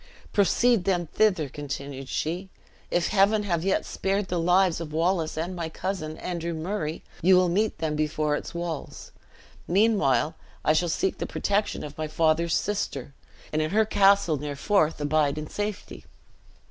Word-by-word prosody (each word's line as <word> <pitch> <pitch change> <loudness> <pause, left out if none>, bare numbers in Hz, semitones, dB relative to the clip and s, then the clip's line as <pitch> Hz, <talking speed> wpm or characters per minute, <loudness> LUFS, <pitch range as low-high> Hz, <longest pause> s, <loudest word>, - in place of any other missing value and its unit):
"Proceed 205 +1 +3
then 180 -3 +1
thither," 185 -9 +2
continued 140 -1 -6
she. 175 +5 -2 0.4
"If 175 -1 +1
Heaven 210 +1 +3
have 170 -5 -1
yet 190 0 +1
spared 195 0 -1
the 175 - 0
lives 180 0 +3
of 155 -2 -6
Wallace 165 0 0
and 175 +3 -3
my 170 -2 -3
cousin, 160 -3 -4
Andrew 170 -2 -4
Murray, 160 -1 -3 0.2
you 185 +2 +6
will 180 -1 +3
meet 210 +5 +1
them 155 -2 -2
before 150 0 0
its - - -6
walls. 170 -3 -5 0.6
Meanwhile 170 - +3 0.3
I 155 - +5
shall 170 +2 +1
seek 190 +4 -1
the - - -2
protection 205 +1 -1
of 150 +1 -9
my 155 - -1
father's 160 +1 +2
sister, 145 -10 -3 0.4
and 155 - +1
in 155 - 0
her 220 +4 +3
castle 200 -5 +4
near 145 0 -4
the - - -14
Forth 165 -3 +2
abide 145 0 +1
in 155 - -4
safety. 205 +2 -5
170 Hz, 165 wpm, -26 LUFS, 155-195 Hz, 0.6 s, you